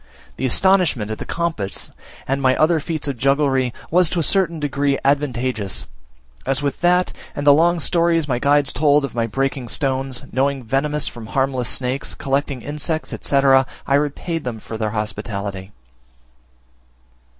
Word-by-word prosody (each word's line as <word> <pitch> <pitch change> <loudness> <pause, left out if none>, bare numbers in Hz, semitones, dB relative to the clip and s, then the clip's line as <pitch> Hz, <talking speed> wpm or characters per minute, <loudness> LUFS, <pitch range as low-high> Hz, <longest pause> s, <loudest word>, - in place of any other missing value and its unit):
The 130 - 0
astonishment 160 - +3
at 110 - -5
the - - -5
compass, 165 -13 -2 0.4
and 135 +1 0
my 130 -1 +3
other 160 +1 +3
feats 155 -1 -3
of 140 -3 -3
jugglery, 135 -1 +2 0.2
was 175 0 +4
to 175 - -1
a - - +1
certain 170 0 +2
degree 140 -1 0
advantageous, 130 -7 -1 0.6
as 135 0 0
with 145 -2 -3
that, 180 +1 +3 0.2
and 145 - -3
the 145 - +8
long 170 +3 +3
stories 165 -1 +2
my 125 -3 0
guides 145 0 +3
told 145 -1 +3
of 135 - -8
my 115 -1 0
breaking 135 +1 -2
stones, 135 +1 -1
knowing 135 0 0
venomous 140 +5 0
from 115 -2 -7
harmless 130 -1 0
snakes, 130 +2 -1
collecting 140 -2 -2
insects, 150 +2 -3
etc., 135 -1 +3 0.2
I - - 0
repaid 150 +3 -1
them 120 -3 -4
for 110 - -8
their 110 -1 -1
hospitality. 100 -2 -4
140 Hz, 155 wpm, -20 LUFS, 125-150 Hz, 0.6 s, the